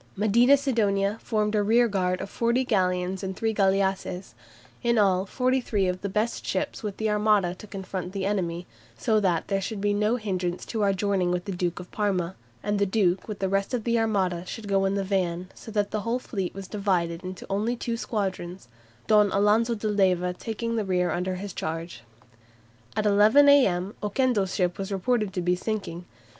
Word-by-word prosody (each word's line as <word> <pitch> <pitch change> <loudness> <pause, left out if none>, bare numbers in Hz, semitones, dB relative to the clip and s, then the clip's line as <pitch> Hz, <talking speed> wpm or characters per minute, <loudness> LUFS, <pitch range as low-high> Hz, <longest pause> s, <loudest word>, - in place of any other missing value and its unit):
Medina 235 +7 +5
Sidonia 210 -6 0
formed 210 -1 0
a 210 - +3
rearguard 200 -5 +2
of 195 - -5
forty 235 +2 +1
galleons 185 -4 0
and 190 -1 -4
three 225 +2 -1
galleasses, 195 - 0 0.5
"in 235 -1 +2
all 195 -2 +3
43 250 -4 0
of 180 0 -2
the 200 - -3
best 215 +4 -1
ships 290 - -3
of 205 -2 -4
the 220 - -1
Armada 210 -4 +2
to 200 +4 -12
confront 190 -2 -5
the 195 -1 -3
enemy, 180 -4 -1 0.3
so 220 -3 +2
that 180 -5 0
there 195 -1 0
should 210 +2 -4
be 205 +1 +1
no 210 +3 +2
hindrance 185 -6 -3
to 225 - -3
our 200 -1 +3
joining 195 -2 0
with 180 0 -1
the 200 - -4
Duke 175 -1 -2
of 180 - -10
Parma; 190 -4 -1 0.3
and 205 0 0
the 200 - +2
Duke 190 -3 +1
with 210 -2 -5
the 195 - -1
rest 195 +5 0
of 235 - -3
the 235 0 +1
Armada 190 -6 0
should 220 +1 -7
go 195 -1 +2
in 195 +1 +1
the 200 - 0
van, 185 -2 -1
so - - -12
that 205 -2 -1
the 215 - -1
whole 230 +3 -1
fleet 195 -8 -4
was 195 -1 -7
divided 185 -4 -1
into 185 0 -7
only 210 +5 0
two 235 -1 -3
squadrons, 190 - -4 0.4
Don 210 -2 +4
Alonso 215 +4 +3
de 215 0 -3
Leyva 185 -3 +2
taking 230 +4 -4
the 220 - 0
rear 180 -3 0
under 180 +2 -1
his 195 +1 -6
charge." 165 -5 -5 0.9
At 215 0 0
11 210 +8 +6
a.m. 200 -9 +4
Oquendo's 210 -3 0
ship 180 -1 0
was 195 +1 -4
reported 210 +1 0
to 180 - -2
be 180 +1 +2
sinking. 180 -3 -4
200 Hz, 195 wpm, -26 LUFS, 185-215 Hz, 0.9 s, 11